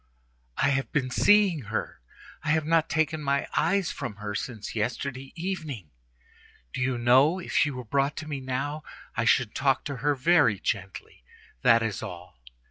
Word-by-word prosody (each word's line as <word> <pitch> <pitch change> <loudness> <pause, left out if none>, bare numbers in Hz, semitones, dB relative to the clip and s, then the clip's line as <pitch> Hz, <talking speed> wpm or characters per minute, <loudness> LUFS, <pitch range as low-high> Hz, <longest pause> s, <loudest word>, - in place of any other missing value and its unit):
I - - +3
have 135 -1 -1
been 130 -5 0
seeing 195 - +4
her; 105 - -4 0.4
I - - -2
have 155 -1 +2
not 165 0 +2
taken 160 -1 0
my 140 -1 0
eyes 195 -3 +1
from 120 -7 -5
her 105 0 -5
since 110 0 -5
yesterday 130 +4 -3
evening. 160 - -5 0.8
Do - - -3
you 130 -1 0
know? 130 +8 +4
If 185 - -7
she 145 - +3
were 125 -3 -6
brought 140 +5 0
to 155 - -6
me 145 -3 -4
now, 135 +4 -3 0.3
I 115 - 0
should 125 -2 +3
talk 135 0 +1
to 140 -3 -5
her 145 +4 +1
very 130 - +3
gently. 95 - -4 0.4
That 115 - +5
is 110 -3 -3
all. 90 -6 -9
135 Hz, 170 wpm, -27 LUFS, 115-155 Hz, 0.8 s, That